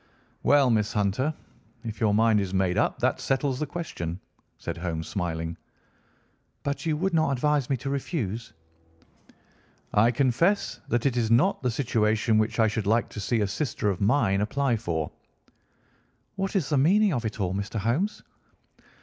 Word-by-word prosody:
"Well, 140 -1 +4
Miss 105 -1 +1
Hunter, 105 +7 +1 0.5
if 110 -2 -6
your 110 -2 +3
mind 110 +1 +4
is 95 -1 -2
made 95 -1 +1
up, - - +1
that - - +1
settles 135 -1 0
the 150 - -2
question," 90 - -5 0.4
said - - -5
Holmes, 85 -2 -3
smiling. 80 -3 -3 1.1
"But 140 +3 -3
you 155 -2 +1
would 190 +3 -1
not 160 -2 +3
advise 145 0 +1
me 135 - +1
to 135 +3 -5
refuse?" 120 - -3 1.4
"I 110 +3 +5
confess 140 - +1
that 120 +1 0
it 135 -3 +2
is 115 -2 +1
not 130 - +3
the 125 - +1
situation 110 -3 +1
which 110 +2 -1
I 110 - +5
should 110 -1 -2
like 115 +2 +2
to - - -8
see 110 +3 0
a 105 - +1
sister 105 0 -1
of 95 - -5
mine 100 -3 +2
apply 135 +3 +1
for." 80 -8 -3 1.2
"What 195 +1 -3
is 170 -8 +1
the 145 -3 +2
meaning 195 +7 +4
of 120 -3 -1
it 110 0 -4
all, 95 -2 0
Mr. 100 +3 -3
Holmes?" 125 - -1
115 Hz, 165 wpm, -26 LUFS, 105-140 Hz, 1.4 s, I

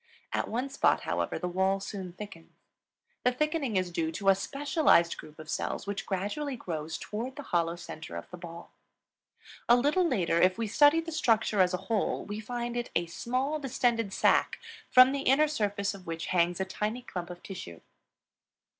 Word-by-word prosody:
At - - 0
one 245 +5 -2
spot, 280 - +2
however, - - -2
the 180 - -3
wall 190 +2 +1
soon 190 -2 -6
thickens. 185 -4 -10 0.7
The 250 - +4
thickening 290 - 0
is 185 -1 0
due 165 -1 -1
to 195 +3 +1
a - - +8
specialized 275 - +2
group 155 0 -12
of 155 -1 -10
cells - - -3
which 200 -1 -4
gradually 210 +10 -2
grows 160 -8 -4
toward 240 +5 -5
the 290 - -7
hollow 170 -6 0
center 160 - -8
of 85 - -6
the 180 - -7
ball. 170 -1 -10 1.0
A 240 - +9
little 290 +9 +3
later, 175 - +1
if 185 +2 +4
we 230 - -1
study 290 +9 +5
the 330 0 -7
structure 225 -9 +2
as 180 0 +3
a 190 +1 -8
whole, 220 -1 0
we 205 +1 -5
find 240 +2 -4
it 240 0 -2
a 170 - +2
small, 255 - -2
distended 235 -6 0
sac, - - +3 0.3
from 255 +1 +8
the 280 0 -1
inner 275 +4 +4
surface 205 -8 -1
of 190 -3 -12
which 165 0 -4
hangs 175 0 +2
a 190 - 0
tiny 210 +6 -3
clump 180 -6 -6
of 175 0 -9
tissue. 85 - -8
205 Hz, 185 wpm, -29 LUFS, 175-255 Hz, 1.0 s, A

